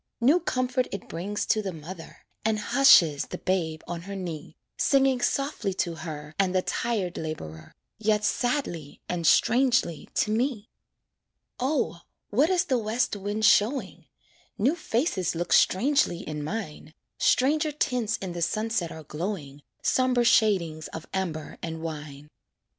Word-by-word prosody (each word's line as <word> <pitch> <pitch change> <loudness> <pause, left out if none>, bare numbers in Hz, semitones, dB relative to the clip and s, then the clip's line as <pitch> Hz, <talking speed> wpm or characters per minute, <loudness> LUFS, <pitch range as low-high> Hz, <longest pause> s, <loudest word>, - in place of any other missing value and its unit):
New 275 +9 +5
comfort 255 -5 0
it 200 - -6
brings 195 +5 -3
to 215 - +2
the 195 -2 -3
mother, 165 +1 -10 0.2
And 220 0 +1
hushes 185 - +5
the 180 - -6
babe 165 -5 -1
on 170 -1 -4
her 200 - -4
knee, 165 -5 -6 0.2
Singing 270 -2 +3
softly 275 -9 -1
to 175 -2 -1
her 155 -2 -7
And 190 -1 +2
the 185 - +2
tired 210 -7 -2
laborer, 80 - -7 0.2
Yet 210 -1 +1
sadly 230 - -1
and 170 -3 -1
strangely 245 - +3
to 215 - +1
me. 230 -1 -1 0.9
O! 260 - 0 0.3
what 275 +10 +3
is 365 -2 +2
the 255 -3 +1
west 220 +1 0
wind 205 +2 -2
showing? 230 +6 +2 0.5
New 255 +9 +2
faces 230 - -1
look 175 +1 -1
strangely 235 - +3
in 150 -5 -5
mine, 155 -3 -6 0.2
Stranger 300 +4 +3
tints 250 -7 0
in 185 -3 -5
the 175 - -5
sunset 215 -1 -1
are 160 - -9
glowing, 150 -3 -5 0.2
Somber 255 -2 +2
shadings 180 -9 +2
of 160 - -8
amber 170 -5 -3
and 160 -1 -5
wine. 150 -2 -7
200 Hz, 140 wpm, -27 LUFS, 165-245 Hz, 0.9 s, New